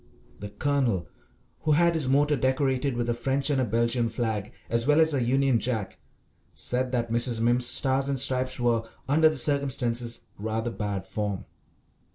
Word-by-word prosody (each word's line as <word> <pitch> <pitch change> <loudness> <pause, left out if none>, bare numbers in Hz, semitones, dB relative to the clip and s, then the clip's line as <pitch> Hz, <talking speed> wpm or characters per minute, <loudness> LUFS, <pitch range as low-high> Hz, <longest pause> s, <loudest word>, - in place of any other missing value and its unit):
The 105 - -7
Colonel, 120 - 0 0.5
who 155 - +1
had 170 +2 +4
his 155 -5 -1
motor 145 +3 +3
decorated 130 0 0
with 120 -1 -1
a 120 - +1
French 135 +4 0
and 135 -2 +1
a - - +1
Belgian 115 +2 +1
flag 110 -2 -3 0.2
as 115 +1 0
well 150 +1 +4
as 160 -1 +5
a 135 - +1
Union 130 0 +2
Jack, 110 -6 -3 0.6
said 125 +1 -1
that 120 -2 -1
Mrs. 120 0 +1
Mimms's 120 +1 +2
Stars 135 +2 +1
and 135 -1 -1
Stripes 130 0 -1
were, 120 -2 +2 0.3
under 155 +3 +5
the 155 - -3
circumstances, 125 -5 0 0.2
rather 110 +2 -2
bad 100 -4 -4
form. 105 -3 -4
125 Hz, 170 wpm, -26 LUFS, 115-135 Hz, 0.6 s, as